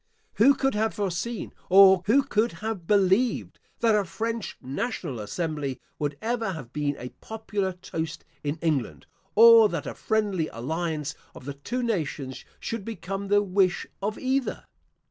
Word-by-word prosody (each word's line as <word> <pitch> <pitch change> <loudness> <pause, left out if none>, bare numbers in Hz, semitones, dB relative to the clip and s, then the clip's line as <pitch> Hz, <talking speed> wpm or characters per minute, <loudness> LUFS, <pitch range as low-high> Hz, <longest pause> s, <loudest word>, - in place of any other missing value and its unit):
Who 270 +6 +6
could 270 0 +1
have 220 +1 0
foreseen, 200 +3 -3 0.2
or 190 -1 +8
who 270 +6 +5
could 235 -3 +1
have 215 -6 -5
believed, 205 +4 +2 0.2
that 230 -2 +4
a 210 -1 +3
French 225 +5 -4
National 140 - -4
Assembly 145 - -3 0.2
would 145 -2 -2
ever 230 -4 -1
have 135 -7 -9
been 145 -1 -1
a 125 - -6
popular 210 -3 -3
toast 165 -2 -5 0.2
in 145 +2 -2
England, 130 - -1 0.3
or 230 -1 +9
that 165 -5 -3
a - - -4
friendly 205 -7 0
alliance 150 +3 -3 0.2
of 125 - -11
the 140 - -4
two 245 - -4
nations 150 - -2 0.2
should 230 -3 -4
become 195 -2 -5
the 205 +1 +4
wish 190 -1 +1 0.2
of 210 +2 -2
either? 265 0 -1
190 Hz, 150 wpm, -26 LUFS, 155-220 Hz, 0.3 s, or